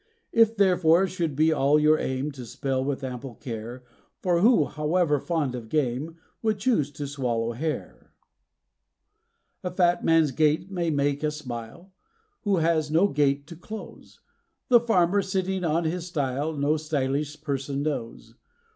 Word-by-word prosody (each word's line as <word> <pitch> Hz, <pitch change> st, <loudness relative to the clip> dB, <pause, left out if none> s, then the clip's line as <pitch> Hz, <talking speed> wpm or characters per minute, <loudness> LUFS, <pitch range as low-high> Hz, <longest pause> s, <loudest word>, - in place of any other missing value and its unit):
It 225 Hz, -1 st, +4 dB
therefore 180 Hz, -2 st, +4 dB
should 170 Hz, -6 st, -3 dB
be 160 Hz, +2 st, +3 dB
all 145 Hz, 0 st, +3 dB
your 155 Hz, +1 st, +4 dB
aim 130 Hz, +3 st, -2 dB
to 135 Hz, -3 st, -9 dB
spell 130 Hz, +2 st, -2 dB
with 140 Hz, 0 st, -3 dB
ample 125 Hz, -1 st, -6 dB
care; 120 Hz, 0 st, -7 dB, 0.4 s
For 175 Hz, -2 st, +2 dB
who, 210 Hz, -, +5 dB
however 150 Hz, +1 st, +1 dB
fond 155 Hz, -4 st, -1 dB
of 120 Hz, -3 st, -7 dB
game, 150 Hz, +3 st, -1 dB, 0.2 s
would 220 Hz, -2 st, +1 dB
choose 200 Hz, -, +1 dB
to 145 Hz, -, -5 dB
swallow 120 Hz, -5 st, -2 dB
hair? 150 Hz, +6 st, -5 dB, 1.5 s
A 180 Hz, -, -2 dB
fat 175 Hz, -1 st, +2 dB
man's 165 Hz, -3 st, +4 dB
gait 155 Hz, +6 st, +1 dB
may 175 Hz, -3 st, -1 dB
make 145 Hz, -1 st, 0 dB
us 150 Hz, 0 st, -1 dB
smile, 125 Hz, +7 st, -8 dB, 0.5 s
who 200 Hz, -3 st, +1 dB
has 160 Hz, -2 st, +1 dB
no 170 Hz, +6 st, +3 dB
gate 140 Hz, 0 st, +1 dB
to 170 Hz, -, -10 dB
close; 215 Hz, +6 st, -10 dB, 0.5 s
The 240 Hz, -2 st, +7 dB
farmer, 200 Hz, -4 st, +2 dB
sitting 190 Hz, -1 st, -2 dB
on 165 Hz, +1 st, +1 dB
his 170 Hz, +2 st, -2 dB
stile 145 Hz, -1 st, -2 dB
no 145 Hz, +2 st, +2 dB
_sty_lish 150 Hz, -1 st, -2 dB
person 140 Hz, -1 st, -2 dB
knows. 130 Hz, -7 st, -4 dB
155 Hz, 150 wpm, -26 LUFS, 140-175 Hz, 1.5 s, The